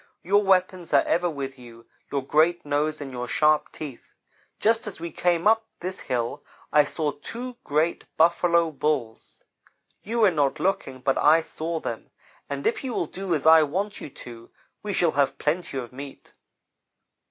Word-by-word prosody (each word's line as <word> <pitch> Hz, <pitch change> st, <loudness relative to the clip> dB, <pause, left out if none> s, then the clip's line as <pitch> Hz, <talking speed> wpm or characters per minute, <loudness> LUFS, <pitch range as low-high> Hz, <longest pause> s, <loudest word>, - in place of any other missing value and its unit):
Your 200 Hz, +3 st, +4 dB
weapons 185 Hz, -3 st, +1 dB
are 140 Hz, -, +6 dB
ever 175 Hz, +1 st, +1 dB
with 135 Hz, -4 st, -6 dB
you 115 Hz, -1 st, -14 dB, 0.3 s
your 140 Hz, -2 st, -2 dB
great 165 Hz, +4 st, +2 dB
nose 150 Hz, +1 st, -1 dB
and 135 Hz, -2 st, -6 dB
your 125 Hz, -1 st, -5 dB
sharp 150 Hz, +4 st, +2 dB
teeth. 145 Hz, -6 st, -9 dB, 0.5 s
Just 225 Hz, +1 st, +2 dB
as 200 Hz, -, -5 dB
we 170 Hz, 0 st, -5 dB
came 175 Hz, 0 st, +1 dB
up 225 Hz, +1 st, +4 dB
this 185 Hz, +2 st, -5 dB
hill 125 Hz, +3 st, -3 dB, 0.3 s
I 150 Hz, -1 st, +6 dB
saw 150 Hz, 0 st, -2 dB
two 240 Hz, -, -7 dB
great 155 Hz, +4 st, 0 dB
Buffalo 170 Hz, 0 st, +3 dB
Bulls. 140 Hz, -6 st, -3 dB, 0.6 s
You 230 Hz, +3 st, -2 dB
were 205 Hz, -4 st, +6 dB
not 145 Hz, -4 st, 0 dB
looking, 135 Hz, -9 st, -1 dB
but 135 Hz, +1 st, +1 dB
I 160 Hz, +2 st, +5 dB
saw 165 Hz, +1 st, -4 dB
them, -, -, -6 dB, 0.4 s
and -, -, -4 dB
if 440 Hz, -6 st, 0 dB
you 255 Hz, -3 st, -3 dB
will -, -, 0 dB
do 185 Hz, +1 st, -3 dB
as 145 Hz, -, -3 dB
I 160 Hz, 0 st, +8 dB
want 195 Hz, +8 st, -2 dB
you -, -, -7 dB
to 120 Hz, -3 st, -11 dB, 0.3 s
we 210 Hz, -, -4 dB
shall 175 Hz, -4 st, +2 dB
have 140 Hz, -1 st, +1 dB
plenty 155 Hz, -2 st, -2 dB
of 125 Hz, -2 st, -6 dB
meat. 140 Hz, +1 st, -10 dB
160 Hz, 175 wpm, -25 LUFS, 140-185 Hz, 0.6 s, I